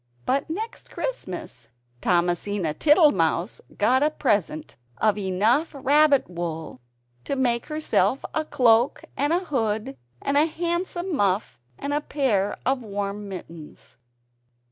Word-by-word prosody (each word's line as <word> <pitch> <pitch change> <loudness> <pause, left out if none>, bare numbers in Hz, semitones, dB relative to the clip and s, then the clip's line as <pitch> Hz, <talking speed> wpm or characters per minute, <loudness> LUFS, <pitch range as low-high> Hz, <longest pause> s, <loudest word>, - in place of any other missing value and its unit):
But 275 +4 0
next 435 +8 -5
Christmas 180 - -5 0.3
Thomasina 175 0 0
Tittlemouse 215 - +3 0.2
got 255 +6 +3
a 300 - +4
present 205 - -1 0.2
of 215 -2 +2
enough 210 - +1
rabbit 285 +1 +4
wool 165 -6 -5 0.4
to - - -2
make 240 -3 +1
herself 305 -3 0
a 315 - 0
cloak 250 -4 +3
and 290 +2 0
a 355 +2 +1
hood, 220 - -1 0.2
and 280 +1 0
a 305 +2 +5
handsome 345 +2 -2
muff 195 - 0 0.2
and 285 - -3
a 295 - +1
pair 225 -10 0
of 265 0 +1
warm 205 -1 -4
mittens. 165 -8 -10
235 Hz, 120 wpm, -24 LUFS, 190-295 Hz, 0.4 s, a